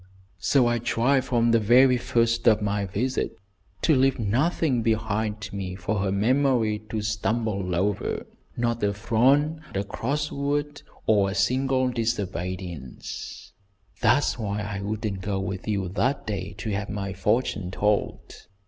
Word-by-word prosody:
"So 135 -3 +3
I 120 0 +1
tried 125 +3 +1
from 120 -2 +2
the 115 - +5
very 125 +4 +5
first 115 0 +1
of 110 -2 +6
my 100 -1 -1
visit 125 +8 -2 0.5
to 160 - +4
leave 135 0 +3
nothing 125 - +1
behind 110 -1 -1
me 95 -2 -4
for 95 +3 -2
her 95 0 0
memory 115 0 +2
to 110 -1 -2
stumble 105 -3 -1
over; 100 +3 -1 0.3
not 120 -1 0
a 100 0 +1
frown, 140 +9 +2
a 100 - 0
cross 145 +9 -2
word, 145 +1 -2 0.2
or 100 -3 +3
a 95 - -4
single 130 +5 +2
disobedience. 95 - -4 0.5
That's 125 +3 +3
why 105 -1 -2
I 100 -1 -4
wouldn't 105 -1 -3
go 95 0 -2
with 95 +1 -4
you 100 -3 0
that 130 +9 0
day 100 -2 -4
to 110 +1 -4
have 100 0 -2
my 100 -2 -3
fortune 100 -1 0
told. 105 +2 -2
110 Hz, 145 wpm, -25 LUFS, 100-125 Hz, 0.5 s, of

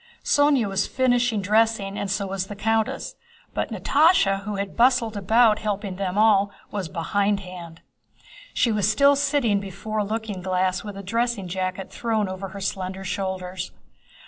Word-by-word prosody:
Sónya 285 -6 +3
was 195 0 0
finishing 245 -4 +1
dressing 215 -1 +2
and 200 - -3
so 200 +1 -1
was 190 -1 -3
the 205 - -7
countess, 220 +1 -1 0.4
but - - -2
Natásha, 280 - +3
who 210 -1 -3
had 200 -1 -4
bustled 235 -2 +3
about 215 +2 +4
helping 205 -3 -3
them 190 -1 -2
all, 205 -2 +4 0.2
was 195 -5 -4
behindhand. 180 -2 -2 0.7
She 235 - +1
was 210 -2 +2
still 280 +6 +5
sitting 275 -7 +1
before 200 +3 -5
a - - +2
looking 215 -2 -4
glass 185 0 0
with 205 -2 -7
a 200 - -7
dressing 230 -1 -1
jacket 185 +1 -3
thrown 220 -1 -1
over 190 +1 -5
her 195 +1 -9
slender 190 0 -3
shoulders. 185 -1 -4
200 Hz, 155 wpm, -24 LUFS, 190-225 Hz, 0.7 s, still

